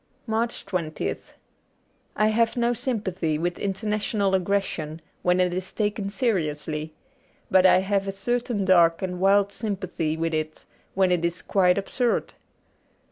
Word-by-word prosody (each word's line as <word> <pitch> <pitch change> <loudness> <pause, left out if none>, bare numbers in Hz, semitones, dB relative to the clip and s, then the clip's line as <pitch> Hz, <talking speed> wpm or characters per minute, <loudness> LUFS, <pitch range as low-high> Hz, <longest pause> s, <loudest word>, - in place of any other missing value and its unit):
85 - - -14
MARCH 230 +2 -1
20th 175 -5 -3 0.9
I 215 - +3
HAVE 230 +2 +1
no 240 0 +2
sympathy 205 - -2
with 175 +2 -2
international 205 0 -1
aggres 195 +1 +2
sion 155 -3 -6 0.2
when 180 +1 +2
it 180 -1 +2
is 185 +1 -4
taken 205 -2 -1
seriously, 155 -8 -2 0.6
but 190 -1 +6
I 185 - +5
have 195 0 0
a - - -1
certain 235 +1 -1
dark 170 -2 +4
and 180 -1 -3
wild 200 +1 +4
sympathy 185 -7 -3
with 165 0 -1
it 155 0 -3 0.3
when 190 -1 +3
it 175 -2 +1
is 170 +1 -2
quite 180 -2 +3
absurd. 235 +4 -1
190 Hz, 145 wpm, -25 LUFS, 175-210 Hz, 0.9 s, but